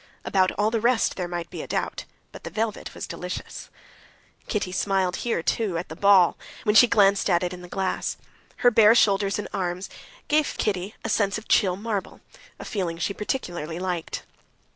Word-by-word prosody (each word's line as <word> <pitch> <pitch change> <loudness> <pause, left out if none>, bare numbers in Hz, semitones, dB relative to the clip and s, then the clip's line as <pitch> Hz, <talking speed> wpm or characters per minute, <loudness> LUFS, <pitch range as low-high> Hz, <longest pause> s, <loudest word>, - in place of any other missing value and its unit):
About 185 -1 +2
all 210 +2 +1
the 225 -1 0
rest 235 0 +2
there 180 -2 -3
might 175 -1 -5
be - - -5
a - - -8
doubt, - - -3 0.3
but - - -12
the - - -5
velvet 220 -1 -3
was - - -5
delicious. 180 0 -7 0.8
Kitty 200 -4 -2
smiled 190 -1 0
here 230 -8 -1
too, 200 -5 0
at 170 - -5
the 160 - -7
ball, 195 -1 +5 0.2
when 210 - +2
she 220 +3 +8
glanced 200 -2 +3
at 175 -1 +3
it 180 0 -2
in 180 - -9
the 180 - -10
glass. 190 +1 -2 0.5
Her 245 - +8
bare 220 0 +6
shoulders 200 -3 +3
and 210 - -4
arms 185 -1 -3 0.4
gave 305 0 +2
Kitty 195 0 -2
a - - -1
sense 200 -2 +1
of 220 - -10
chill 185 -5 +3
marble, 205 -1 -4 0.4
a - - -9
feeling 180 -5 -3
she 175 +4 -1
particularly 175 - -4
liked. 180 -2 -3
195 Hz, 185 wpm, -25 LUFS, 180-215 Hz, 0.8 s, she